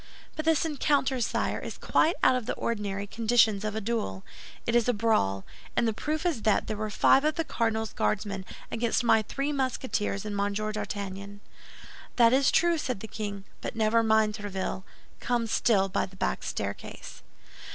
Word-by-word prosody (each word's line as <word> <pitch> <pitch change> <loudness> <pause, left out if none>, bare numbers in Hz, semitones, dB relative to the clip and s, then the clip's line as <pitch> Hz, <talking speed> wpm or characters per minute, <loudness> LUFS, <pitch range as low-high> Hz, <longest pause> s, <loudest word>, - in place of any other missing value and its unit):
"But 310 - -4
this 320 0 +3
encounter, 280 -4 +1
sire, - - 0
is - - -7
quite 330 - +2
out 255 - +6
of 250 -3 -3
the - - -1
ordinary 205 -3 -2
conditions 220 -1 +2
of 215 0 -2
a 220 - -2
duel. 195 - -2 0.4
It 235 - 0
is 240 0 +3
a 245 - +2
brawl; 100 - +1 0.3
and 235 - +2
the 225 - +1
proof 305 +8 -3
is 320 -10 0
that 215 -2 +2
there 215 - -3
were 215 +1 -3
five 265 +6 +4
of 305 0 +1
the 330 - 0
cardinal's 225 -6 -1
Guardsmen 195 -2 -1 0.3
against 235 +1 0
my 225 -2 +5
three 275 +7 -3
Musketeers 255 -7 -1
and 210 -1 -3
Monsieur 205 +1 -1
d'Artagnan." 200 -1 -5 0.8
"That 235 -1 +5
is 270 +1 +4
true," 340 -1 +3
said 255 -9 -3
the 220 - -6
king; 205 -3 -5 0.2
"but - - -5
never 225 +1 +3
mind, 220 -1 +3
Tréville, 200 -3 -4 0.4
come 240 -1 0
still 210 -3 +2
by 190 - -1
the 190 - -16
back 190 - -1
staircase." - - -6
220 Hz, 180 wpm, -28 LUFS, 205-250 Hz, 0.8 s, out